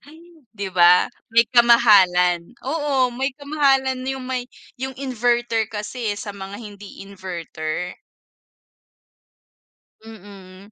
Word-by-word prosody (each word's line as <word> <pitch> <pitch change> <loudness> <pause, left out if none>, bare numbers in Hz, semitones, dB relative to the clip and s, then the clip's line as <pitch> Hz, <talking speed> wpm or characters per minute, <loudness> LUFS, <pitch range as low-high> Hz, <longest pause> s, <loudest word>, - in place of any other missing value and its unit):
Ay 310 +3 -16 0.3
'di 200 -3 -5
ba, 175 0 +6 0.2
may 230 0 +4
kamahalan, 190 -8 +5 0.2
oo, 275 -5 0
may 265 +2 -1
kamahalan 270 -3 +1
'yong 265 -1 -5
may 250 -1 -4 0.3
'yong 265 +1 -6
inverter 240 -3 0
kasi, 210 +1 -4
eh, 205 - -4
sa 205 -1 -7
mga 195 +1 -8
hindi 205 -3 -11
inverter. 180 -3 -6 2.1
Mm. 200 -2 -14
225 Hz, 105 wpm, -21 LUFS, 195-255 Hz, 2.1 s, ba